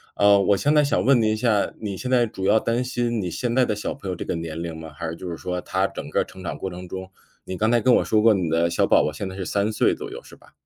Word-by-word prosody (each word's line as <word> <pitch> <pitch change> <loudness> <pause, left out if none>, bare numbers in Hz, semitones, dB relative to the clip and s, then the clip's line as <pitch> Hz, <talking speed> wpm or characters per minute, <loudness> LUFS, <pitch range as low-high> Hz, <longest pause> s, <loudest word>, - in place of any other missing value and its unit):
呃， 100 0 +5
我 100 +1 +3
现 145 +9 +2
在 150 - +5
想 145 - +1
问 135 -2 +5
您 110 0 +2
一 - - 0
下， 110 -2 +1
你 100 -3 -4
现 125 - -5
在 125 -2 +4
主 95 -3 -6
要 110 +3 +4
担 115 +2 0
心 120 -2 -1
你 90 -2 -3
现 120 +4 -2
在 130 -1 +4
的 105 - -1
小 105 - -3
朋 100 - -10
友 90 - -2
这 - - -5
个 - - -2
年 80 -1 -5
龄 85 -1 -5
吗？ 80 0 -9
还 85 +2 -5
是 85 - -5
就 90 +2 -7
是 85 - -5
说 90 0 -3
他 95 +2 0
整 - - -8
个 - - +1
儿 - - +1
成 95 0 -13
长 - - -4
过 95 - -4
程 90 0 -9
中 95 +1 -7 0.4
你 95 - -5
刚 110 +4 +1
才 120 -2 +3
跟 125 +2 +5
我 - - +2
说 110 -1 +2
过， 115 0 +6
你 95 -4 -1
的 85 +1 +2
小 - - +2
宝 - - +4
宝 75 - -1
现 85 +6 -5
在 95 - -7
是 95 - -4
3 100 +3 0
岁 - - +2
左 420 -1 -8
右 470 +5 -8
是 - - -14
吧？ - - -22
100 Hz, 350 characters per minute, -23 LUFS, 90-120 Hz, 0.4 s, 过